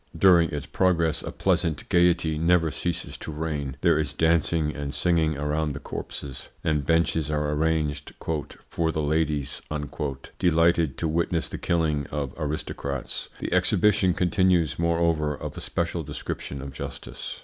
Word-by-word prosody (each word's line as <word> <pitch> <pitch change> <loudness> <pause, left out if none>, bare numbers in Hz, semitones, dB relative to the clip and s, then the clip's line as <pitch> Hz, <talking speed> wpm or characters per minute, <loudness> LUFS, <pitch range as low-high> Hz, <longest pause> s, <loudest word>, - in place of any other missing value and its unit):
During 85 -2 +6
its 75 0 -4
progress 85 -3 +1
a - - -5
pleasant 80 -3 0
gaiety 85 -3 +3
never 85 -1 +3
ceases 85 +4 -3
to - - -6
reign. 75 -3 -3
There 75 - +4
is 75 - -1
dancing 80 -1 +2
and 70 -1 -4
singing 80 -2 +1
around 75 +1 -1
the 70 - -6
corpses, 70 -2 -7
and 75 -3 +1
benches 80 0 +2
are 75 -1 0
arranged 75 -2 0 0.6
"for 80 -1 +1
the 80 - -2
ladies," 75 -2 0 0.8
delighted 85 -3 +3
to 80 - -1
witness 85 +1 0
the - - -6
killing 75 -4 0
of 70 -3 -3
aristocrats. 70 -3 -4
The - - -3
exhibition 105 -4 +3
continues, 90 -3 +2
moreover, 85 -3 +1
of - - -6
a - - -6
special - - -1
description 70 -1 -5
of 70 -1 -7
justice. - - -7
80 Hz, 145 wpm, -26 LUFS, 75-85 Hz, 0.8 s, During